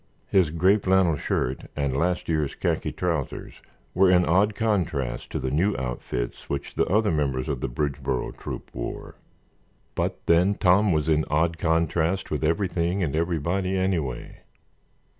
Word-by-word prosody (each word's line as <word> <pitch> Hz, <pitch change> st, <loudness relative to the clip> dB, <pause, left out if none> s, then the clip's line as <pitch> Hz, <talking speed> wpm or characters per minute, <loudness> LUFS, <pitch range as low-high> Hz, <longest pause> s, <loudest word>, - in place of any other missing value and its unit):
His 95 Hz, -5 st, +3 dB
gray 90 Hz, +6 st, +3 dB
flannel 95 Hz, -4 st, +3 dB
shirt 65 Hz, -2 st, -2 dB
and 70 Hz, -2 st, -1 dB
last 90 Hz, +5 st, 0 dB
year's 75 Hz, -4 st, 0 dB
khaki -, -, -1 dB
trousers 85 Hz, -6 st, -3 dB, 0.3 s
were 95 Hz, +1 st, +4 dB
in 90 Hz, -1 st, +5 dB
odd 100 Hz, +6 st, +3 dB
contrast 90 Hz, -, -1 dB
to -, -, -3 dB
the 65 Hz, -, -2 dB
new 95 Hz, +8 st, +1 dB
outfits -, -, -4 dB
which 70 Hz, 0 st, -4 dB
the -, -, +1 dB
other 105 Hz, +3 st, +2 dB
members 70 Hz, -4 st, -1 dB
of 70 Hz, -5 st, -3 dB
the -, -, -2 dB
Bridgeboro 70 Hz, -1 st, -2 dB
Troop -, -, -7 dB
wore. -, -, -6 dB, 0.8 s
But -, -, -3 dB
then 90 Hz, +5 st, +4 dB
Tom 100 Hz, +2 st, +4 dB
was 75 Hz, -2 st, +1 dB
in 80 Hz, -1 st, +3 dB
odd 80 Hz, +2 st, +1 dB
contrast 80 Hz, +3 st, 0 dB
with 75 Hz, 0 st, -1 dB
everything 90 Hz, +2 st, 0 dB
and 75 Hz, -3 st, -1 dB
everybody 85 Hz, +3 st, 0 dB
anyway. 85 Hz, -10 st, -2 dB
85 Hz, 150 wpm, -25 LUFS, 75-95 Hz, 0.8 s, in